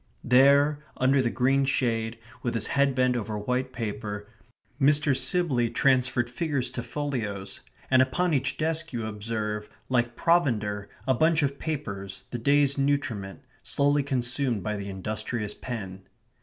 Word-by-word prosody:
There, 140 +4 +4
under 130 +1 +3
the 120 - +1
green 135 +3 +2
shade, 115 -4 0 0.2
with 120 -2 -2
his 110 - +1
head 140 -1 +3
bent 125 -1 +2
over 110 -2 -3
white 125 +5 -2
paper, 105 -3 -5 0.5
Mr. 145 0 +4
Sibley 130 -3 +3
transferred 130 -2 +2
figures 130 -1 -1
to 125 - -4
folios, 115 -7 -4 0.3
and 130 0 +6
upon 165 +7 +1
each 135 - 0
desk 160 0 -1
you 115 -2 -3
observe, 105 0 -4 0.2
like 120 -1 +1
provender, 110 -13 +1 0.2
a 130 - +3
bunch 160 +4 +3
of 140 0 -1
papers, 100 - -5
the 120 - -3
day's 140 +2 +3
nutriment, 135 -9 -1 0.2
slowly 145 +1 +2
consumed 125 - 0
by 105 0 -2
the 100 -1 -5
industrious 105 +2 -4
pen. 95 -6 -7
125 Hz, 145 wpm, -27 LUFS, 110-140 Hz, 0.5 s, and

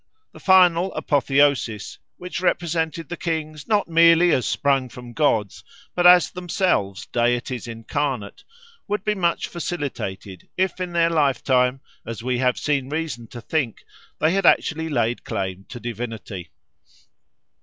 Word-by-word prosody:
The - - -14
final 185 -1 +4
apotheosis, 140 - +1 0.2
which 180 0 -6
represented 165 -3 -1
the 175 - -5
kings 155 -3 -4
not 210 -2 +2
merely 165 +1 +5
as 125 - +1
sprung 135 -3 +1
from 120 -1 -11
gods 115 -10 0 0.3
but 175 0 +4
as 180 -1 +7
themselves 175 - -1
deities 120 0 -1
incarnate, 115 -1 -4 0.4
would 210 -1 -2
be 210 - +1
much 175 -4 0
facilitated 130 - -5
if 190 0 0
in 180 -1 -4
their 170 -1 +3
lifetime, 135 -4 +2 0.2
as 115 0 -7
we 125 0 -1
have 125 -1 +2
seen 140 -3 -1
reason 150 -7 -4
to 120 +2 -10
think, 135 -3 -2 0.3
they 155 +2 +2
had 195 -2 +2
actually 160 0 +2
laid 120 -4 0
claim 95 -3 -4
to 120 - -8
divinity. 115 -6 -6
145 Hz, 135 wpm, -22 LUFS, 120-170 Hz, 0.4 s, as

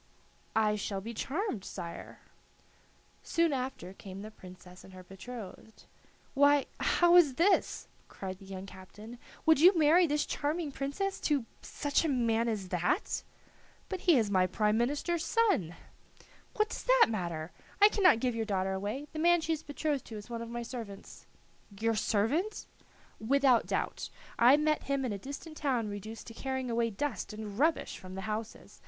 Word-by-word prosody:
"I 210 -1 +2
shall 200 -1 -3
be 225 +4 -7
charmed, 270 - -3
sire." 170 -4 -8 1.0
Soon 335 -2 +1
after 255 -8 -4
came 195 0 -9
the 215 - -8
Princess 180 -2 -14
and 190 - -14
her 185 0 -11
betrothed. 215 +2 -10 0.5
"Why, 285 0 +4
how 345 0 +4
is 295 -7 +5
this?" 360 +7 +2 0.2
cried 190 -1 -7
the 195 - -14
young 190 0 -7
captain; 205 +5 -12 0.3
"would 320 -3 +5
you 360 +3 +7
marry 325 +3 +5
this 295 0 0
charming 300 +1 -2
princess 285 +9 -3
to 285 -6 0 0.2
such 290 +1 -1
a - - +1
man 230 -3 +1
as 205 -5 -3
that?" 180 - 0 0.7
"But 375 - -3
he 325 - +7
is 215 -4 +1
my 185 -2 +3
prime 210 +3 +1
minister's 290 +8 0
son!" 390 - +1 0.8
"What 430 0 +1
does - - -5
that - - +6
matter? 170 -7 -4 0.3
I 410 - +9
cannot 370 - +4
give 250 0 0
your 230 0 -1
daughter 190 -2 -1
away. 205 +9 -3
The 310 - -4
man 345 +2 +5
she 325 0 -1
is 315 - -4
betrothed 290 -1 -2
to 220 - -8
is 210 +3 -10
one 230 -1 -4
of 230 - -6
my 240 0 -4
servants." 225 -5 -9 0.5
"Your 225 +1 +1
servant?" 230 - 0 0.5
"Without 265 +1 +3
doubt. - - -2 0.3
I 250 +5 +7
met 305 0 0
him 275 -1 0
in 235 - -2
a 200 - -5
distant 285 - -8
town 250 -7 0
reduced 210 +2 -7
to 230 - -10
carrying 260 0 -3
away 230 0 +1
dust 225 -1 -4
and 210 0 -7
rubbish 320 +3 +1
from 185 0 -10
the 190 - -5
houses. 215 +2 -6
235 Hz, 170 wpm, -31 LUFS, 205-295 Hz, 1.0 s, I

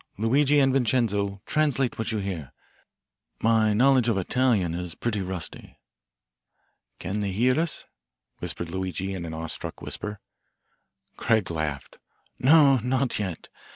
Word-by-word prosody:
Luigi 140 +7 +3
and 135 -1 +3
Vincenzo, 105 -6 +1
translate 140 -6 0
what 110 - -1
you 110 - -1
hear. 95 -8 -4 0.9
My 110 -1 +3
knowledge 125 +2 +4
of 110 - +1
Italian 100 -3 +1
is 85 -1 -5
pretty 110 -4 -2
rusty." 95 -2 -6 1.2
"Can 95 +4 -3
they 100 -2 -1
hear 125 +8 +2
us?" 165 -1 -1 0.5
whispered 85 -1 -5
Luigi 95 +1 -3
in 90 -3 -5
an 80 - -6
awe 80 +1 -4
struck 80 - -5
whisper. 105 -1 -5 1.0
Craig 110 -6 +1
laughed. 75 -4 -4 0.4
"No, 140 0 +6
not 125 +1 -1
yet. 95 -5 -5
105 Hz, 130 wpm, -26 LUFS, 95-130 Hz, 1.2 s, No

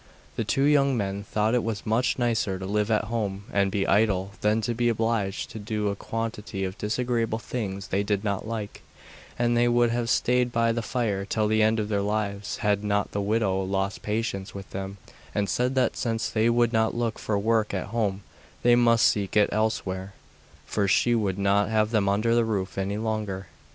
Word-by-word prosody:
The - - -1
two 135 - +1
young 140 -2 +4
men 100 -1 -2
thought 105 +2 0
it 125 - +2
was 110 -3 -3
much 115 +3 +1
nicer 115 -6 0
to 95 - -6
live 105 +2 0
at 110 -1 +2
home 105 -3 -3
and 100 -1 +2
be 95 0 0
idle 100 -2 +2
than 105 +1 +2
to 120 +2 -1
be 120 +1 +1
obliged 110 -3 -1
to 110 - -7
do 105 0 -2
a 100 - -2
quantity 110 -2 -4
of 95 0 -5
disagreeable 115 0 0
things 100 -5 -5
they 100 - +1
did 100 0 -1
not 100 0 -2
like, 110 -2 -5 0.6
and 120 0 +2
they 120 0 +3
would 120 -1 +3
have 120 0 -1
stayed 125 +1 +2
by 115 -1 +2
the 115 +1 -1
fire 110 -4 -1
till 105 +2 0
the 110 +1 +2
end 110 +1 +3
of 105 - -1
their 100 -2 0
lives 100 -1 -2
had 105 0 +2
not 100 0 0
the 100 - -2
widow 100 -2 +1
lost 95 +1 -2
patience 105 -3 -3
with 100 -1 -8
them 95 +1 -5 0.4
and 105 -1 +1
said 125 +8 0
that 130 - +2
since 115 -1 -1
they 110 +1 +2
would 120 0 +2
not 110 0 +2
look 120 -2 -1
for 105 - -1
work 110 +1 +1
at 95 0 -3
home 100 -4 -1 0.4
they 120 - +6
must 115 -2 +5
seek 100 0 0
it 105 - +5
elsewhere, 100 -3 -1 0.5
for 100 -2 0
she 120 +4 +3
would 100 -5 0
not 100 +1 +2
have 110 0 +1
them 105 -4 +2
under 105 +4 +1
her 120 0 +4
roof 100 -4 -2
any 100 +1 -2
longer. 105 -4 -3
105 Hz, 205 wpm, -26 LUFS, 100-115 Hz, 0.6 s, they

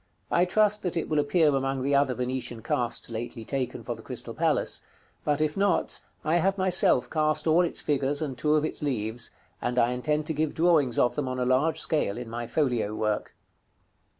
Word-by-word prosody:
I 175 - +4
trust 210 +3 +2
that 180 -2 -2
it 165 - -1
will 155 -1 +2
appear 155 +2 +3
among 135 -1 -1
the 140 +1 0
other 140 -2 +3
Venetian 125 -2 -3
casts 120 0 -1
lately 115 0 -5
taken 130 -1 -3
for - - -4
the - - -12
Crystal - - -4
Palace; - - +1 0.4
but 150 0 0
if 155 -1 0
not, 200 -2 +1 0.2
I 160 +3 +2
have 195 +3 +1
myself 180 -9 +3
cast 155 +2 0
all 165 +2 +4
its 175 - -1
figures, 145 0 0
and 145 -4 -3
two 150 +5 +1
of 155 0 +2
its 155 - 0
leaves, 115 -4 -1 0.3
and 120 +1 -2
I 120 0 +3
intend 150 +5 -1
to 160 - -1
give 155 0 -1
drawings 160 -7 +3
of 120 - +3
them 145 -3 -2
on 130 0 -3
a 125 - 0
large 130 +6 +2
scale 150 -11 0
in 120 -2 -7
my 120 0 -4
folio 120 -8 0
work. 105 -1 -2
140 Hz, 205 wpm, -27 LUFS, 125-155 Hz, 0.4 s, I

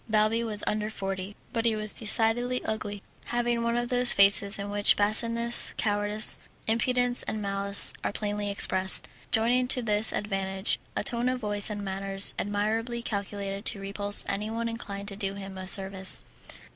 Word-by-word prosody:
Balbi 215 +2 -1
was 215 -3 -2
under 210 0 -4
forty, 195 -1 -8 0.2
but 230 -2 -3
he 225 -1 -1
was 215 -1 +3
decidedly 235 +3 -1
ugly, 205 -2 -7 0.2
having 240 -1 -3
one 235 0 -3
of 240 0 -4
those 245 -1 +10
faces 200 +1 +6
in 200 0 -8
which 205 0 +1
baseness, 230 +3 +6
cowardice, 205 0 +1 0.3
impudence, 245 +2 0
and 215 - -6
malice 200 0 0
are - - -4
plainly 205 0 -5
expressed, 190 -1 +3 0.2
joining 245 +3 -1
to 250 -1 +1
this 215 0 -1
advantage 195 -1 -4 0.2
a - - -4
tone 240 +1 +1
of 255 0 -5
voice 205 -2 -2
and 205 -1 -8
manners 195 0 -2
admirably 225 +4 -5
calculated 200 -1 -7
to 200 - -5
repulse 200 +1 +1
anyone 220 +3 -5
inclined 200 -3 -9
to 200 - -10
do 195 -1 -6
him 195 -1 -11
a 185 0 -10
service. 190 0 -1
210 Hz, 160 wpm, -24 LUFS, 200-230 Hz, 0.3 s, those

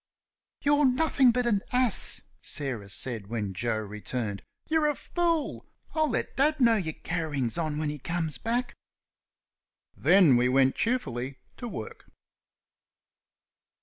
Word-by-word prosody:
"You're 290 0 +4
nothing 265 0 +4
but 245 +1 +1
an 205 -4 +2
ass!" 250 -4 +2 0.2
Sarah 125 -9 -4
said 110 -1 -4
when 105 -3 -3
Joe 115 +4 -1
returned. 105 0 -4 0.3
"You're 315 -1 +2
a 295 - +1
fool! 335 -2 -1 0.3
I'll 315 -1 +2
let 230 - -2
father 300 +3 +2
know 235 -3 +5
your 160 -7 -2
carryings 150 -8 -2
on 155 -3 -1
when 150 -1 -1
he 150 - -7
comes 165 +1 -2
back." 240 +1 -1 1.2
Then 175 -9 +5
we 125 +1 +3
went 135 0 +4
cheerfully 135 - -2 0.2
to 245 - -6
work. 110 - -8
165 Hz, 130 wpm, -28 LUFS, -, 1.2 s, know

